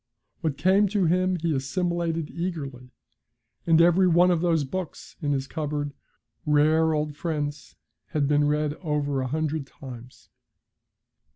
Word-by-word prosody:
What 155 -6 -2
came 195 +3 +4
to 200 -1 +1
him 185 +2 +2
he 165 -2 -1
assimilated 165 +2 -1
eagerly, 140 -8 -5 0.8
and 165 -1 +5
every 175 +2 +5
one 175 +1 +5
of 170 -2 +1
those 165 -3 +2
books 175 +5 -6
in 145 -2 0
his 135 -1 0
cupboard, 145 -1 -3 0.5
rare 155 +2 +3
old 150 -1 -2
friends, 145 -3 -4 0.3
had 150 -3 0
been 145 0 +3
read 150 0 0
over 145 -4 -1
a 130 - -2
hundred 155 0 -2
times. 125 -2 -12
155 Hz, 135 wpm, -26 LUFS, 145-170 Hz, 0.8 s, and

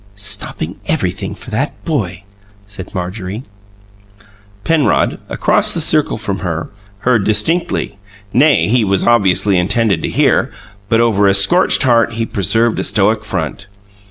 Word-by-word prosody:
"Stopping 100 -1 -2
everybody - - -1
for - - -12
that 135 +7 -1
boy!" 100 - -3 0.4
said 100 -2 -10
Marjorie. 95 +4 -5 1.2
Penrod, 155 -6 +1
across - - +1
the - - -1
circle 155 -5 +1
from 100 -3 -4
her, 85 -3 -4 0.3
heard 120 -5 +2
distinctly 110 - -1 0.3
nay, 145 +4 +3
he 120 +2 +2
was 100 -2 0
obviously 100 -4 +3
intended 100 -1 +1
to - - -3
hear; - - +1 0.4
but 115 +1 +3
over 105 -4 +2
a 100 - +3
scorched 175 - +4
heart 115 -3 +2
he 115 0 -2
preserved 115 +4 +1
a - - -1
stoic - - +1
front. 100 - -4
110 Hz, 135 wpm, -15 LUFS, 95-120 Hz, 1.2 s, scorched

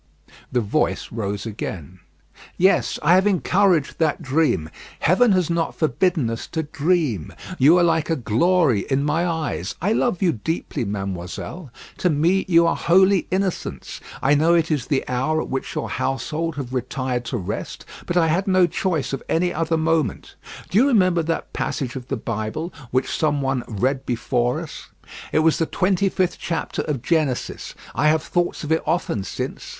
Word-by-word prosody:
The 125 - +1
voice 105 - -1
rose 100 -2 -3
again: 95 -5 -6 0.6
"Yes, 190 +2 +3
I 165 +4 +5
have 190 +2 +4
encouraged 185 -4 +2
that 155 -3 +1
dream. 135 - +1 0.3
Heaven 205 +8 +4
has 185 -3 +2
not 170 -1 -1
forbidden 160 -1 +1
us 115 - -5
to 160 -1 -3
dream. 150 - 0 0.3
You 150 +7 +6
are 175 - +4
like 165 -2 +1
a 165 - +2
glory 140 - +2
in 135 0 +1
my 160 +4 +1
eyes. 155 - -3
I 200 +6 +1
love 225 -6 0
you 175 - +4
deeply, 145 0 -3
mademoiselle. 100 - -5 0.3
To 180 - +2
me 170 +5 +2
you 170 -2 +5
are 165 - +2
holy 190 +2 +3
innocence. 185 - -3 0.2
I 140 - +4
know 160 +4 +4
it 165 -1 +1
is 145 -5 -1
the 140 -3 0
hour 135 +5 0
at - - -4
which 135 - -4
your - - -2
household 150 +5 -2
have 130 -3 -6
retired 130 0 -2
to 120 +2 -2
rest, 90 - -5 0.2
but 175 - 0
I 170 - +4
had 170 +5 +1
no 185 -1 +5
choice 170 -4 -1
of 135 - -3
any 175 +2 +1
other 165 +1 0
moment. 160 -7 0 0.4
Do 200 - +4
you 265 - +5
remember 185 -9 +3
that 165 0 -3
passage 130 -2 -3
of 125 -2 -7
the 135 - -2
Bible 115 - -4 0.2
which 130 +1 0
some 150 -2 +1
one 135 -2 0
read 130 +5 -1
before 120 0 0
us; - - -9 0.4
it - - +3
was 160 - +3
the 165 - +1
twenty 190 +1 +1
fifth 185 -1 -1
chapter 165 -1 -3
of 140 -6 -3
Genesis. 155 -7 -1 0.2
I 150 - +2
have 155 0 +3
thought 175 -2 -1
of 150 - -4
it 160 - +3
often 160 - 0
since. 95 - -5
155 Hz, 175 wpm, -22 LUFS, 130-175 Hz, 0.6 s, You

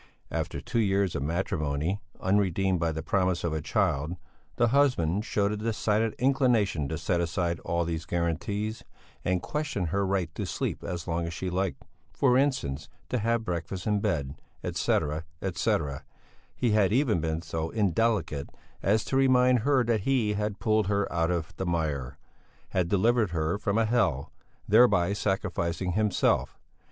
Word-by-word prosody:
After - - -2
two 120 0 -2
years 100 -3 +2
of - - -1
matrimony, 80 +2 -1 0.2
unredeemed 95 -1 +1
by 85 -1 +1
the 80 0 -4
promise 95 -1 +1
of 85 -2 -1
a 80 - -2
child, 75 +4 0 0.4
the 120 -1 +3
husband 110 - +2
showed 100 0 +1
a 105 - -2
decided 110 0 0
inclination 120 - +2
to 80 - -2
set 85 +1 0
aside 85 0 -1
all 85 0 -1
these 80 -1 -3
guarantees, 85 +6 -2 0.4
and 90 0 0
question 150 -11 -2
her 100 0 +2
right 95 -4 -1
to - - -4
sleep - - -3
as 85 -2 -5
long 85 0 -1
as 85 - -5
she 95 +1 -3
liked, 95 +1 -2 0.3
for 125 -3 +3
instance, 130 - 0 0.2
to 125 - 0
have 115 +1 0
breakfast 90 0 -4
in 105 -1 +2
bed, 70 -8 -1 0.3
etcetera, 75 +2 0 0.2
etcetera; 75 -6 -1 0.5
he 120 -3 +1
had 105 -3 +3
even 120 - +2
been 80 +1 -2
so 80 0 -3
indelicate 100 -7 0 0.3
as 105 +2 +2
to - - -2
remind 130 -2 +4
her 135 +2 +3
that 115 -3 +1
he 115 -3 +1
had 105 0 -2
pulled 110 -3 +1
her 100 -2 0
out 85 -1 +1
of 85 -2 -2
the 95 - -2
mire; 75 -7 -2 0.5
had 90 -2 0
delivered 110 +2 +3
her 85 +3 -1
from 105 0 0
a 115 - +3
hell, 110 - +1 0.4
thereby 100 -5 +5
sacrificing 95 -3 -1
himself. 105 +1 +1
95 Hz, 160 wpm, -28 LUFS, 85-110 Hz, 0.5 s, thereby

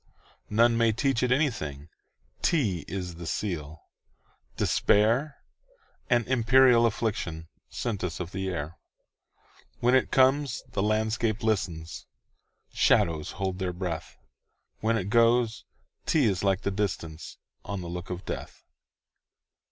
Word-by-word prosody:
None 115 +2 +4
may 115 -1 +4
teach 130 +2 0
it 125 -1 +1
anything,'T 105 - -2
is 90 -2 -5
the 85 -1 -7
seal, 80 -7 -4 0.7
despair,—An 140 - 0
imperial 125 -1 +5
afflictionSent 95 +1 -4
us 90 -3 -3
of 90 0 -5
the 95 0 -3
air. 80 -2 -5 1.0
When 125 +1 +3
it 130 - +3
comes, 135 0 +2
the - - -1
landscape 110 +1 0
listens, 95 -7 -2 0.7
Shadows 80 -2 +2
hold 95 -1 -3
their 90 -2 -2
breath; 90 -3 -5 0.6
When 115 +1 +1
it 100 -1 -3
goes, 115 -1 +3 0.4
't 160 - +3
is 95 -2 -1
like 95 0 +2
the 100 - -1
distanceOn 85 -5 -4 0.4
the 85 - -7
look 90 +1 -6
of 90 0 -6
death. - - -7
105 Hz, 115 wpm, -27 LUFS, 90-120 Hz, 1.0 s, imperial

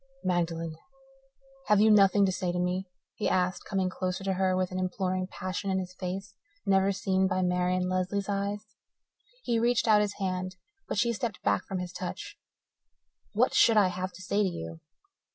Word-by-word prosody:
"Magdalen, 165 -3 -1 0.9
have 210 -1 +5
you 215 +1 +6
nothing 200 -1 +6
to 190 - +1
say 180 -1 -1
to 175 - -3
me?" 180 +2 -1 0.3
he 215 - -1
asked, 180 0 0
coming 190 -2 0
closer 185 0 -3
to 195 0 0
her 185 0 +1
with 185 -1 0
an 185 - -3
imploring 185 0 -1
passion 185 +1 -4
in 190 - +1
his 185 -1 -4
face 190 +2 -5 0.3
never 195 0 +3
seen 190 -1 +1
by 185 -1 0
Marian 180 0 +1
Lesley's 185 +2 -1
eyes. 200 +1 -2 0.8
He 230 -1 +1
reached 240 0 +2
out 210 -1 +6
his 205 -1 -1
hand, 185 -1 -3 0.3
but - - -3
she 235 +3 +2
stepped 225 -2 -4
back 100 -1 +1
from 190 - -3
his 180 -1 -5
touch. 410 - -6 1.0
"What - - +2
should 225 -2 +5
I 200 -3 +5
have 185 +1 -4
to 185 +2 -11
say 200 +2 +1
to 195 - +2
you?" 80 - -7
185 Hz, 185 wpm, -29 LUFS, 180-200 Hz, 1.0 s, you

